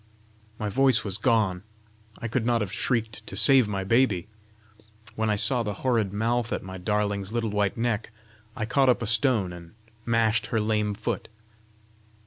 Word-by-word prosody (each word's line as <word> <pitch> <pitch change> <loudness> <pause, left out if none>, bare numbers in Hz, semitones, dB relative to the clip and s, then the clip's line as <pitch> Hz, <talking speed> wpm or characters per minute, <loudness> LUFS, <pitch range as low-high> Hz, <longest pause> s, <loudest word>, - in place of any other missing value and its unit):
"My 105 - -3
voice 130 +5 +2
was 100 -3 -3
gone; 105 -7 +1 0.6
I 115 - -5
could 115 +1 -1
not 120 -1 +1
have 100 -2 -3
shrieked 110 -1 -2
to - - -7
save 135 -5 +5
my 100 -2 -3
baby! 105 -4 +2 0.9
When 110 0 -1
I 105 - +2
saw 125 +4 +2
the 105 -3 -3
horrid 115 -6 +1
mouth 115 +3 -1
at - - -2
my 95 0 -8
darling's 100 0 -1
little 115 -2 -1
white 105 0 0
neck, 115 -2 -1 0.5
I 115 -4 -2
caught 130 +3 +2
up 125 - +2
a - - -1
stone 110 -4 +2
and 85 -1 -12 0.3
mashed 115 -1 +1
her 115 - 0
lame 105 -1 0
foot." 110 - -4
110 Hz, 170 wpm, -26 LUFS, 100-120 Hz, 0.9 s, save